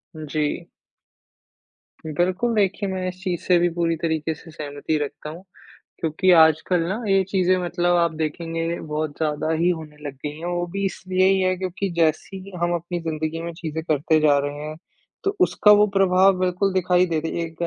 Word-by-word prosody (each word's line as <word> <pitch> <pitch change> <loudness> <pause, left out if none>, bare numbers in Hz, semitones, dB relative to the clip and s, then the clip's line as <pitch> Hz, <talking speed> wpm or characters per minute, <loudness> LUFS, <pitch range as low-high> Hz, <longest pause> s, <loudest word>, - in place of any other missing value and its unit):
जी। 155 -1 -3 1.4
बिल्कुल, 180 +9 0
देखिए 200 -1 +1
मैं 185 -1 -3
इस 185 - -4
चीज़ 180 -3 -2
से 180 - +4
भी 175 - +2
पूरी 165 -1 +1
तरीके 160 -1 -1
से 160 +2 -14
सहमति 150 0 -3
रखता 145 +1 -5
हूँ 170 +4 -10 0.6
क्योंकि 165 +4 +1
आजकल 160 +2 +4
ना, 210 +6 -3
ये 195 0 +4
चीज़ें 185 -1 +2
मतलब 175 0 +1
आप 170 -1 +2
देखेंगे 165 +2 -2
बहुत 155 0 -3
ज़्यादा 155 0 -1
ही 165 +2 +2
होने 155 -3 -5
लग 140 - -5
गई 150 +1 -4
हैं, 170 - -6
वो 175 0 -1
भी 195 +3 -4
इसलिए 185 0 0
ही 195 0 +3
है 185 0 +2
क्योंकि 185 +1 -3
जैसी 170 +4 -1
हम 175 0 +1
अपनी 175 +1 -3
ज़िंदगी 160 0 -3
में 170 0 -5
चीज़ें 160 -1 -5
करते 155 0 +2
जा 150 -2 +4
रहे 145 +1 -4
हैं, 155 0 -6 0.5
तो 395 +1 0
उसका 220 -11 +4
वो 210 0 +6
प्रभाव 190 0 +4
बिल्कुल 185 +2 0
दिखाई 180 -1 +3
दे 160 -2 -1
देगा 165 +1 -3
170 Hz, 180 wpm, -23 LUFS, 155-185 Hz, 1.4 s, वो